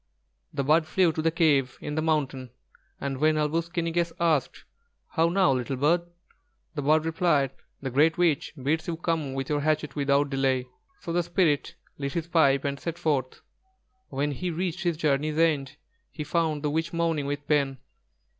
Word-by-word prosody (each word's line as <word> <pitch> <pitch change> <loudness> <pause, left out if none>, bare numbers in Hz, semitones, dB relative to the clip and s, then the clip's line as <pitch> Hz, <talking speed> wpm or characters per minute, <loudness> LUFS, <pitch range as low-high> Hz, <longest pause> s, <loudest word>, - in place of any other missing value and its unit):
The 140 - -2
bird 155 +3 +3
flew 180 +1 +3
to 155 - -2
the 165 - +3
cave 150 -6 +2
in 150 - -5
the 155 - 0
mountain, 140 -5 -1 0.5
and 135 -1 -3
when 155 +1 +3
Āl 150 -1 +1
wūs 165 +1 -1
ki 170 -1 -1
ni 165 - -1
gess 170 0 0
asked: 160 -6 +1 0.5
"How 165 +1 +2
now, 185 -4 +3
little 130 0 -1
bird?" 150 +7 +3 0.7
the 150 - -3
bird 155 +3 +3
replied: 160 -5 +2 0.3
"The 135 - -3
Great 155 +5 +3
Witch 170 -5 +1
bids 150 +5 -1
you 165 -1 -2
come 160 -5 -2
with 135 0 -3
your 150 -1 0
hatchet 150 -1 0
without 140 0 +2
delay." 135 -2 +1 0.4
So 170 - -4
the 175 - +3
Spirit 175 -4 +1 0.2
lit 140 -1 -3
his 170 -2 -2
pipe 140 -5 +3
and 140 0 -2
set 170 -1 -4
forth. 135 -6 -1 0.7
When 145 +2 -1
he 180 +6 -3
reached 175 +1 -2
his 175 -4 0
journey's 150 0 0
end, 150 -4 +1 0.3
he 150 - -6
found 155 -1 0
the 150 - 0
witch 160 +2 -1
moaning 165 -4 0
with 145 0 -4
pain. 140 -3 +1
155 Hz, 185 wpm, -27 LUFS, 140-165 Hz, 0.7 s, bird